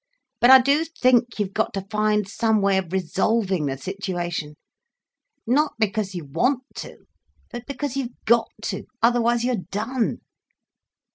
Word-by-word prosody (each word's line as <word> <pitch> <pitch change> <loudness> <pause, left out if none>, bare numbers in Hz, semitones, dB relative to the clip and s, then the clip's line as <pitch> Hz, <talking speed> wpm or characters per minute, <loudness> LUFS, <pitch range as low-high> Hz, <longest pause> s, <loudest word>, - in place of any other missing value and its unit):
"But 240 - +5
I 265 0 +10
do 280 +5 +2
think 250 -7 +2
you've 200 -2 -2
got 220 - -1
to 195 -1 -4
find 210 -1 +1
some 220 +1 +1
way 195 -1 +3
of 180 -3 -6
resolving 190 -1 0
the 135 0 -3
situation—not 175 -3 -4 1.2
because 210 -2 -1
you 170 -4 -5
want 245 - 0
to, - - -9 0.5
but 240 0 -8
because 280 -1 -4
you've 255 -3 -4
got 230 0 +3
to, - - -4 0.2
otherwise 240 0 +3
you're 245 -7 -1
done. 225 +4 -2
215 Hz, 140 wpm, -23 LUFS, 190-240 Hz, 1.2 s, I